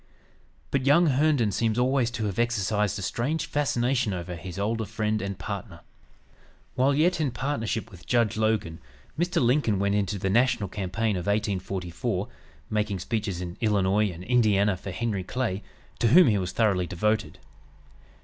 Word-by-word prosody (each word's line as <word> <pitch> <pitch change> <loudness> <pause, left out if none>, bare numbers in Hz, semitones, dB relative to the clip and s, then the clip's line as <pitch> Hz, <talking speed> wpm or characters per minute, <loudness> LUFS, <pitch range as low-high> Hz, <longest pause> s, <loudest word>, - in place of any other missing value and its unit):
But 135 -1 0
young 170 +5 +6
Herndon 140 -6 +2
seems 110 +3 0
always 125 -1 +2
to 120 -3 -3
have 100 +1 -3
exercised 105 -3 0
a 100 - -5
strange 145 - -1
fascination 130 -6 0
over 90 0 -5
his 90 +1 -8
older 110 +3 -1
friend 110 0 -1
and 100 -1 -4
partner. - - -6 0.9
While 135 +2 +2
yet 165 +3 +2
in 145 - +1
partnership 115 -3 -3
with 90 -3 -14
Judge 115 -4 +2
Logan, 110 -7 0 0.4
Mr. 175 +1 0
Lincoln 120 -4 +2
went 100 +1 +1
into 100 -1 0
the 95 - -2
national 115 -3 +2
campaign 105 +2 -1
of 90 - -5
1844, 100 0 -2 0.4
making 105 -2 0
speeches 100 -1 -3
in 90 -1 -6
Illinois 105 -1 +2
and 90 0 -8
Indiana 105 -3 +3
for 95 +2 -8
Henry 100 0 -2
Clay, 105 -2 -2 0.4
to 120 - +3
whom 175 +11 +7
he 105 -2 +2
was 90 -1 -3
thoroughly 95 -6 +1
devoted. 105 +5 -1
110 Hz, 160 wpm, -26 LUFS, 95-125 Hz, 0.9 s, whom